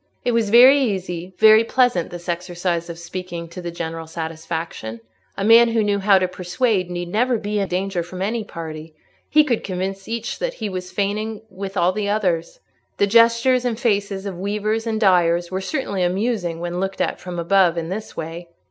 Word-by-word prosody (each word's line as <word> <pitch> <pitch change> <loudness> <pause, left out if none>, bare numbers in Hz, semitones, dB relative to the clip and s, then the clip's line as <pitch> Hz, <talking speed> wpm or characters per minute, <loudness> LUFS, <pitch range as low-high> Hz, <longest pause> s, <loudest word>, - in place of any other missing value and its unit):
It 245 - +2
was 230 -3 +1
very 255 +5 +8
easy, 185 -5 -3
very 220 +1 +7
pleasant, 240 -8 +1
this 175 0 -9
exercise 175 -1 -2
of 170 - -6
speaking 170 -1 -6
to 180 +2 -8
the 175 - -5
general 165 -1 -5
satisfaction: 160 -7 -5 0.4
a 195 - -2
man 230 +3 +7
who 225 -1 +1
knew 205 -1 +1
how 195 0 +5
to 185 -1 +1
persuade 185 +2 -1
need 175 0 -4
never 240 +5 +1
be 210 0 -2
in 195 - 0
danger 185 0 -1
from 175 +2 -8
any 220 +3 -1
party; 160 -4 -8 0.3
he 305 0 +6
could 245 -6 -1
convince 190 +1 -4
each 230 0 -4
that - - -2
he 215 -2 -4
was 185 -1 -6
feigning 210 +3 -2
with 195 +1 -6
all 175 +1 +3
the 205 +1 -2
others. 200 - -1 0.4
The 200 - +3
gestures 230 +4 +4
and 240 -2 -2
faces 200 -4 0
of 190 -3 -5
weavers 210 +3 -1
and 220 -1 -1
dyers 175 -4 +3
were 190 +1 -2
certainly 200 -5 -2
amusing 180 -2 -1
when 175 +1 -3
looked 195 +1 -3
at - - -1
from 180 -1 -7
above 175 0 +3
in 165 0 -3
this 210 +4 -6
way. 165 +2 -6
190 Hz, 190 wpm, -21 LUFS, 175-220 Hz, 0.4 s, very